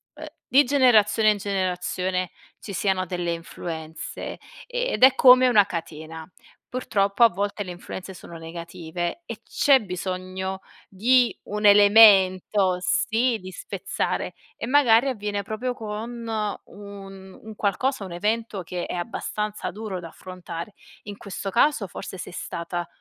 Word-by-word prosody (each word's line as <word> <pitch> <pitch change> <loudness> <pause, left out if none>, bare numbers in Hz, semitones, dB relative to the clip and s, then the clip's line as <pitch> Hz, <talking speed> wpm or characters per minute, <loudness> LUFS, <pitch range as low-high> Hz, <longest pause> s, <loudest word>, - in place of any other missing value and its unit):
uhm, - - -9 0.2
di 275 +4 +5
generazione 225 -5 +4
in 210 - -1
generazione 185 -2 -2 0.3
ci 200 - -8
siano 185 0 0
delle 175 -1 -2
influenze 160 -1 -7 0.3
ed - - -1
è 260 0 +8
come 255 -1 +7
una 215 -5 +5
catena. 160 -3 -7 0.4
Purtroppo 205 -4 +1
a 230 - +8
volte 205 +2 -3
le 185 - -9
influenze 185 +1 -8
sono 170 -1 -11
negative, 170 - -6
e - - -7
c'è 275 -2 +4
bisogno 185 0 -5 0.3
di 245 +5 +3
un 210 0 -4
elemento, 200 -2 +6
sì, 230 +6 +1
di 185 0 -9
spezzare, - - -3 0.2
e - - -4
magari 250 -2 +4
avviene 205 -5 -3
proprio 230 +5 -4
con 230 +2 -6
un 200 -3 -7
un 220 -1 -9
qualcosa, 215 +3 -1
un 185 - -9
evento 210 +2 -2
che 175 +1 -5
è - - -4
abbastanza 210 +2 -4
duro 210 -3 -6
da 170 - -8
affrontare. 180 +1 -8 0.3
In 205 -1 -8
questo 195 0 -6
caso 240 -1 +2
forse 190 - -8
sei 175 - -8
stata 175 0 -5
200 Hz, 135 wpm, -24 LUFS, 180-225 Hz, 0.4 s, è